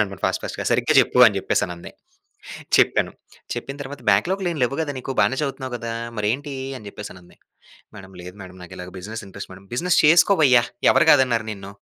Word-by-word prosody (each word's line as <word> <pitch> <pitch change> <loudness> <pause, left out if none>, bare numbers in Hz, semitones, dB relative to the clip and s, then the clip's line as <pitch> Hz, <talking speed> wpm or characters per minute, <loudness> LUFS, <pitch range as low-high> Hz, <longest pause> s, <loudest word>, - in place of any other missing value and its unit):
చెప్పాననమాట, 100 -3 -2
ఫాస్ట్ - - 0
ఫాస్ట్‌గా. - - -5
"సరిగ్గ - - +1
జెప్పు." - - +6
అని - - +2
జెప్పేసనంది. 85 -1 -2 0.9
చెప్పాను, - - +2 0.4
చెప్పిన 135 - -6
తర్వాత 140 +1 -9
"బ్యాక్‌లాగ్‌లేం 185 -2 0
లెవ్వు 125 +3 0
గదా 145 -2 -4
నీకు? 130 +1 -5
బానే 130 - +2
చదువుతున్నావు 135 -3 -4
గదా? 115 0 -6 0.3
మరేంటి?" 130 +8 -2 0.2
అని 105 - -14
జెప్పేసనంది. 95 -3 -11 0.6
"మేడమ్ 95 -1 -13
లేదు 90 +1 -10
madam, 90 0 -13
నాకిలాగా 90 0 -10
business 110 +4 -7
interest 100 +1 -9
madam." 95 +1 -15
"Business 175 +7 +1
చేసుకోవయ్యా! 155 -6 +5 0.3
ఎవరు - - +3
కాదన్నారు 125 -5 +3
నిన్ను? 100 -1 -9
115 Hz, 160 wpm, -22 LUFS, 95-140 Hz, 0.9 s, జెప్పు